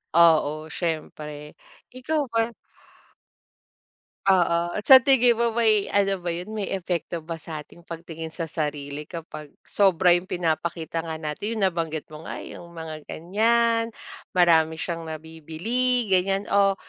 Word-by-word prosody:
Oo, 155 -2 +4
siyempre. 150 -3 -4 0.4
Ikaw 295 +5 -1
ba? 225 0 +2 1.8
Oo, 175 -2 +3
sa 260 +2 +10
tingin 250 -3 +4
mo 235 -1 +1
may 215 -3 +3
ano 195 -1 +1
ba 175 - -8
yun, 175 +5 -3
may 215 -2 -3
epekto 175 -2 -3
ba 165 0 -6
sa 155 -1 -7
ating 170 +3 -19
pagtingin 165 -1 -7
sa 165 -4 -4
sarili 150 -1 -4
kapag 160 -3 -8 0.2
sobra 185 -3 +3
yung 175 +2 +2
pinapakita 165 -1 -2
nga 160 -1 -4
natin, 160 +9 -4
yung 215 - -1
nabanggit 165 -5 -1
mo 155 +1 -10
nga, - - -6
yung 175 - -10
mga 155 -2 -7
ganiyan. 230 +6 +2 0.5
Marami 165 -3 +4
siyang 165 0 -4
nabibili, 165 +10 -2
ganiyan 195 +2 +1
o, 200 -1 +4
170 Hz, 135 wpm, -25 LUFS, 160-200 Hz, 1.8 s, sa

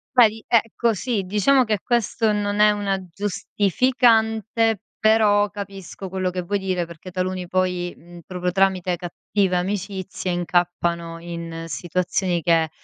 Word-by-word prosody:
Vedi? 225 -3 +5
Ecco 230 0 +2
sì, 220 0 -1
diciamo 210 +8 +3
che 215 -3 0
questo 230 -2 +1
non 205 0 -1
è 210 0 +6
una 200 -2 -1 0.2
giustificante, 220 +2 +1 0.2
però 215 -2 +4
capisco 195 -1 -8
quello 185 0 -1
che 180 0 -3
vuoi 200 +4 -1
dire. 185 -2 -1
Perché 170 +2 -11
taluni 185 0 -2
poi, 180 -1 -1
mhmm, 175 +1 -14
proprio 180 -1 -2
tramite 185 -1 +1
cattive 185 +2 -1
amicizie, 190 0 -3
incappano 175 -1 -1
in 170 -1 -6
situazioni 175 +1 -1
che, 165 -1 +3
190 Hz, 130 wpm, -22 LUFS, 175-210 Hz, 0.2 s, è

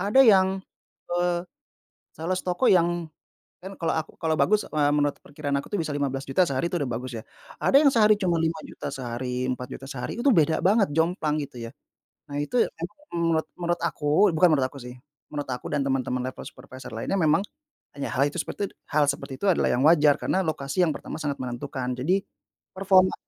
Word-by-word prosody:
Ada 205 +7 +4
yang, 195 -5 +6 0.7
eee, 175 0 +1 0.7
sales 180 +4 -2
toko 180 +8 +2
yang 175 -2 +2 0.6
kan 195 -1 -9
kalau 165 - 0
aku 160 -1 -3
kalau 160 -1 +1
bagus, 210 +5 +2
eee, 145 -1 +2
menurut 145 -1 +1
perkiraan 145 -1 -3
aku 140 - -7
tuh 205 - 0
bisa 155 - -4
Rp15.000.000 135 +3 0
sehari 135 +4 -1
itu - - -1
udah 140 - 0
bagus 125 +2 -5
ya, - - -8 0.4
ada - - +2
yang 300 - +6
sehari 215 -4 +5
cuman 180 -3 +1
Rp5.000.000 160 -3 -4
sehari, 125 0 -3
Rp4.000.000 125 +1 -6
sehari, 135 - -5
itu 280 - +2
beda 160 - +3
banget, 200 +3 +4
jomplang 160 -1 0
gitu 125 - -18
ya. - - -10 0.6
Nah 145 - -3
itu 230 +12 +1
emang 170 - -5 0.2
menurut 165 -2 +1
menurut 175 0 -1
aku 150 -3 -2 0.2
bukan 170 +2 +4
menurut 135 -3 +2
aku 140 - -11
sih, 125 -1 -9 0.4
menurut 145 -2 -4
aku 125 - -5
dan 145 - +1
teman-teman 130 -2 -1
level - - -10
supervisor 130 -3 -11
lainnya, 115 +12 -2
memang 160 +1 +3 0.6
hanya 140 - -2
hal 135 - +2
itu - - -7
seperti 200 - -4
itu - - -24 0.2
hal 150 -1 +5
seperti 140 -1 -6
itu - - +1
adalah 175 - +2
yang 125 - +1
wajar 150 -2 +6
karena 190 - 0
lokasi 155 +3 0
yang 155 - 0
pertama - - -7
sangat 145 -4 -3
menentukan, 125 +1 -4
jadi 180 +10 +1 0.5
performa 185 -1 +3
155 Hz, 190 wpm, -25 LUFS, 135-180 Hz, 0.7 s, yang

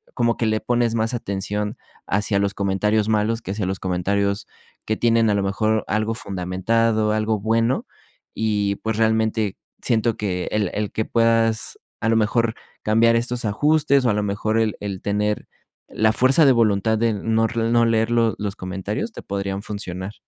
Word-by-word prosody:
como 120 -1 +1
que 115 - 0
le 110 0 +1
pones 120 -1 +1
más 115 +1 0
atención 105 -1 -3 0.3
hacia 100 0 +1
los 100 0 0
comentarios 105 +2 +1
malos, 110 +2 +1
que 95 - -5
hacia 100 -1 -2
los 95 0 -3
comentarios 100 +2 -1 0.4
que 110 - -1
tienen 115 -1 +3
a 105 - +2
lo 100 - 0
mejor 110 +2 0
algo 110 +2 0
fundamentado, 105 +4 0
algo 110 0 0
bueno. 115 +4 +1 0.5
Y, 105 -2 0
pues 110 -1 -3
realmente 110 -2 +1 0.3
siento 115 -1 +1
que 90 -4 -2
el 105 -4 0
el 105 -1 -2
que 110 - -2
puedas 115 -1 +1 0.2
a 115 - +1
lo 115 - +3
mejor 115 +1 +1 0.3
cambiar 115 +2 +4
estos 120 0 -1
ajustes, 140 +5 +2
o - - +4
a - - +1
lo 105 0 0
mejor 105 +2 0
el 110 -2 +1
el 100 -2 -5
tener 105 +1 -1 0.4
la 110 0 +2
fuerza 135 +7 +4
de 135 - +7
voluntad 110 -2 +2
de 115 0 +1
no 110 +2 +1
r 115 0 -1
no 120 0 +4
leer 115 0 +1
los 115 -1 +2
los 100 -1 -3
comentarios 95 - -4
te - - -8
podrían 100 0 -3
funcionar. 95 -2 -5
110 Hz, 180 wpm, -22 LUFS, 100-115 Hz, 0.5 s, de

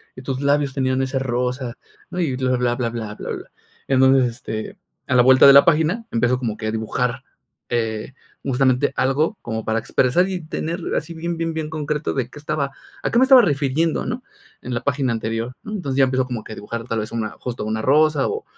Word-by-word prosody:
y 130 - -9
tus 130 0 -3
labios 140 -1 +2
tenían 130 -1 0
ese 135 0 -1
rosa", 125 -1 -2 0.3
¿no?, 180 - -5
y 155 -7 0
bla, 130 0 0
bla, 120 -1 +1
bla, 120 -2 -1
bla, 115 -2 -5
bla. - - -6 0.4
Entonces, 130 -1 +5
este, 110 -3 -6 0.3
a 130 - +1
la 125 - +7
vuelta 130 +1 +7
de 140 - +10
la 140 - +8
página 170 +7 +2
empiezo 120 +2 +1
como 115 -4 -3
que 110 - -4
a - - 0
dibujar, 115 +3 -2 0.5
eh, 115 +1 -2 0.3
justamente 130 0 +2
algo 150 +10 +1
como 110 -1 -3
para 110 0 0
expresar 130 +9 +2
y 185 -2 -3
tener 165 +3 -4
así 160 +3 -3
bien, 170 +1 -4
bien, 165 0 -2
bien 160 -1 -3
concreto 150 -1 -2
de 130 -3 -1
qué 150 - -11
estaba 145 -1 -2 0.3
a - - -1
qué - - +2
me - - +6
estaba 260 -1 +8
refiriendo, 150 0 +1
¿no?, 245 +2 -4 0.4
en 125 - -5
la 120 - -1
página 135 -3 0
anterior, 115 +2 -3
¿no? 215 - -8
Entonces 140 -10 -3
ya 135 - +6
empiezo 130 0 0
como 120 -4 -5
que - - -9
a - - -8
dibujar, 115 +3 -6
tal 115 -2 -1
vez 110 - -5
una 115 -2 -2
justo 120 -3 -5
una 110 +1 -2
rosa, 150 +3 +3
o 440 +1 -3
130 Hz, 215 wpm, -21 LUFS, 120-150 Hz, 0.5 s, de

